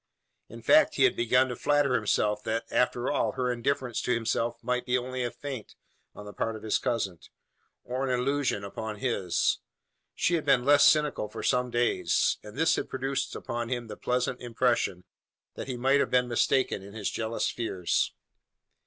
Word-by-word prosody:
In - - -11
fact, - - +5
he - - +3
had - - +4
begun 125 +3 +3
to 125 - -3
flatter 145 0 +2
himself, 105 -2 +1
that, 115 +1 -1
after 125 0 +1
all, - - 0
her 125 -1 -1
indifference 125 0 -1
to - - -1
himself 115 +1 -1
might 125 +1 0
be 125 0 +1
only 130 0 -3
a 120 - -1
feint 130 -4 -8 0.4
on 105 - -10
the 105 - -9
part 115 0 -2
of 110 - -10
his 110 - +1
cousin, 100 -8 -2 0.6
or 130 +2 -3
an 135 - -1
illusion 135 -5 0
upon 110 +2 -5
his. 105 -6 0 0.6
She 175 - +1
had 165 -3 +1
been 135 -4 +3
less 145 0 +7
cynical 150 -8 +2
for - - -7
some 125 -1 +1
days; 120 0 +1
and 105 +3 -12
this 160 +1 +3
had - - -3
produced 135 +1 -2
upon 120 -1 -4
him 120 -2 -2
the - - -6
pleasant 125 0 -1
impression, 120 -6 0 0.5
that - - -7
he 130 -2 -4
might 135 +3 +3
have - - +1
been 125 -1 +2
mistaken 120 -2 +1
in 100 +2 -12
his 105 -3 -2
jealous 110 0 -2
fears. 95 -7 -1
125 Hz, 185 wpm, -28 LUFS, 110-130 Hz, 0.6 s, less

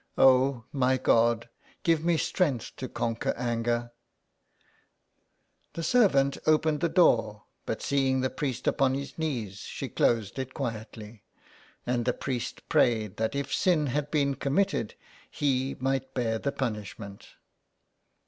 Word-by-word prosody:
" - - -41
Oh, 130 -2 +4
my 130 -1 +2
God, 115 -1 +2 0.4
give 165 -2 +2
me 170 -1 +2
strength 145 - -1
to 130 - -5
conquer 115 -1 -2
anger." 120 0 -1 1.8
The 165 - -4
servant 155 - +3
opened 155 -1 +3
the 170 - +1
door, 115 - +3 0.2
but 110 - -3
seeing 135 -2 +1
the 130 - -1
priest 130 -5 -3
upon 135 -1 +2
his 140 0 -6
knees, 115 -11 -3
she - - -6
closed 115 0 +1
it 130 0 -5
quietly, 110 -3 -6 0.6
and 120 -1 0
the 125 - +2
priest 125 -2 -5
prayed 110 -4 +2
that 110 +4 -1
if 140 0 -3
sin 170 -5 +2
had 145 0 -1
been 140 -3 +1
committed 140 - 0 0.3
he 135 -2 0
might 135 0 -2
bear 115 -3 0
the 140 - -1
punishment. 105 -5 -6
130 Hz, 135 wpm, -28 LUFS, 115-140 Hz, 1.8 s, Oh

